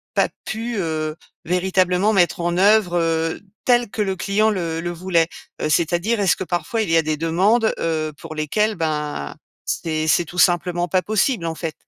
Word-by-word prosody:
pas - - +3 0.2
pu, 230 +2 -4
heu, 155 -3 -2 0.3
véritablement 185 +3 +2
mettre 175 -3 +2
en 175 0 -1
œuvre, 200 -2 +4
heu, 165 -1 0 0.2
tel 240 -2 +3
que 215 - -3
le 190 -1 -2
client 200 +4 +1
le 165 -5 -2
le 175 +1 -3
voulait? 170 -1 +1 0.4
C'est-à-dire, 175 +8 +1
est-ce 195 -4 +3
que - - -4
parfois 180 +5 -2
il 210 - -4
y 165 - +5
a - - +5
des 155 0 -1
demandes, 195 +9 +2
heu, 155 -2 -1
pour 155 - -8
lesquelles, 210 +8 0
ben, 150 - -3 0.3
c'est 155 -1 -2
c'est 160 - +3
tout 175 +3 -6
simplement 175 0 +2
pas 185 +2 +1
possible, 215 -2 0
en 165 - -2
fait? 160 -1 -4
175 Hz, 180 wpm, -21 LUFS, 165-200 Hz, 0.4 s, y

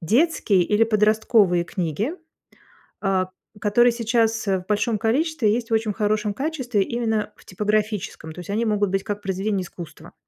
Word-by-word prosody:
детские 215 - +2
или 210 +5 +3
подростковые 215 -4 +3
книги, 180 - -2 0.9
а, 190 -2 0 0.3
которые 240 +4 +4
сейчас, 225 -1 0
э, 195 -1 +2
в 180 - -16
большом 210 +1 0
количестве 255 +1 +1
есть 235 +1 -2
в 225 - +2
очень 220 -1 +1
хорошем 210 0 0
качестве 260 -6 -1
именно 220 -1 -1
в - - -20
типографическом, 210 -4 -2
то 155 - -14
есть 180 - -8
они 220 +3 0
могут 205 -3 +1
быть 195 0 0
как 205 -1 -4
произведения 195 +1 -1
искусства. 170 -3 -10
210 Hz, 160 wpm, -23 LUFS, 195-230 Hz, 0.9 s, которые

